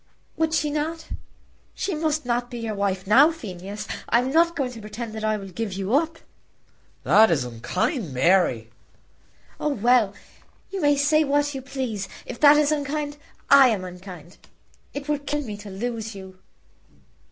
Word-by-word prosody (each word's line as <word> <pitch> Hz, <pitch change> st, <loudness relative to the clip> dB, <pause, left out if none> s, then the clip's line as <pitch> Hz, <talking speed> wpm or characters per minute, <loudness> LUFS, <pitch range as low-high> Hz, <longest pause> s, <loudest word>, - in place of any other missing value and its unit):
"Would 320 Hz, 0 st, 0 dB
she 300 Hz, -2 st, 0 dB
not? 315 Hz, +2 st, -3 dB, 0.7 s
She 390 Hz, -, -2 dB
must 310 Hz, -2 st, -1 dB
not 245 Hz, 0 st, -1 dB
be 240 Hz, -, -7 dB
your 225 Hz, -2 st, -3 dB
wife 195 Hz, -2 st, -1 dB
now, 260 Hz, +10 st, +6 dB
Phineas. 205 Hz, -, -7 dB, 0.2 s
I -, -, +4 dB
am 250 Hz, +2 st, 0 dB
not 335 Hz, +2 st, +3 dB
going 265 Hz, -4 st, -1 dB
to 230 Hz, -3 st, -10 dB
pretend 215 Hz, +2 st, -7 dB
that 220 Hz, 0 st, -6 dB
I 215 Hz, 0 st, +1 dB
will 195 Hz, -1 st, -8 dB
give 200 Hz, +2 st, -4 dB
you 195 Hz, +3 st, -3 dB
up." 320 Hz, +3 st, +1 dB, 0.9 s
"That 220 Hz, +1 st, +6 dB
is 150 Hz, -6 st, +1 dB
unkind, 165 Hz, -, -2 dB
Mary." 130 Hz, -5 st, +2 dB, 0.9 s
"Oh, 300 Hz, -, 0 dB
well; 235 Hz, -5 st, +2 dB, 0.6 s
you 390 Hz, -1 st, -3 dB
may 290 Hz, -1 st, +4 dB
say 305 Hz, +2 st, +3 dB
what 290 Hz, 0 st, +1 dB
you 270 Hz, -, -5 dB
please. 250 Hz, -7 st, -4 dB, 0.2 s
If 240 Hz, -, -8 dB
that 295 Hz, 0 st, +7 dB
is 300 Hz, 0 st, +3 dB
unkind, 290 Hz, 0 st, -2 dB, 0.3 s
I 275 Hz, -1 st, +9 dB
am 215 Hz, -6 st, 0 dB
unkind. 180 Hz, -2 st, -10 dB, 0.5 s
It 285 Hz, +1 st, -6 dB
would 295 Hz, -1 st, -2 dB
kill 295 Hz, 0 st, -1 dB
me 215 Hz, -5 st, -6 dB
to 205 Hz, 0 st, -10 dB
lose 220 Hz, +2 st, -4 dB
you." 190 Hz, -1 st, -11 dB
240 Hz, 170 wpm, -24 LUFS, 195-290 Hz, 0.9 s, I